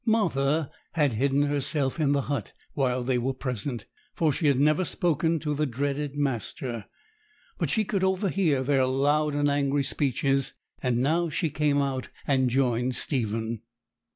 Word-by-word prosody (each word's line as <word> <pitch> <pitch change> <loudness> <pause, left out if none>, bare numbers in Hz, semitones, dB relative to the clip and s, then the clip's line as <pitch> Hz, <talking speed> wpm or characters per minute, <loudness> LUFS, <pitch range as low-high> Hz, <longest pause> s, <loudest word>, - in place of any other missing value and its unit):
Martha 160 - +1 0.2
had 150 -6 +2
hidden 135 +5 +2
herself 145 0 0
in 145 -3 +2
the 140 -1 +2
hut 135 -7 -3 0.2
while 130 -3 0
they 125 0 +1
were 130 +2 -1
present, 125 -2 -4 0.3
for 155 -3 +2
she 155 - 0
had 140 -2 +3
never 155 +5 +3
spoken 165 -1 +1
to 150 -1 -2
the 150 +1 0
dreaded 140 +3 -2
master; 125 -4 -3 0.7
but - - 0
she 220 -1 +1
could 190 -1 -1
overhear 190 -7 +1
their 135 -1 +2
loud 145 +3 +2
and 145 0 +2
angry 140 0 +1
speeches, 135 0 0 0.3
and 125 -2 +1
now 165 +4 +2
she 160 0 -1
came 150 -1 +1
out 135 -2 -3 0.2
and 130 -2 +2
joined 125 -1 +1
Stephen. 115 -4 -2
140 Hz, 155 wpm, -27 LUFS, 130-150 Hz, 0.7 s, had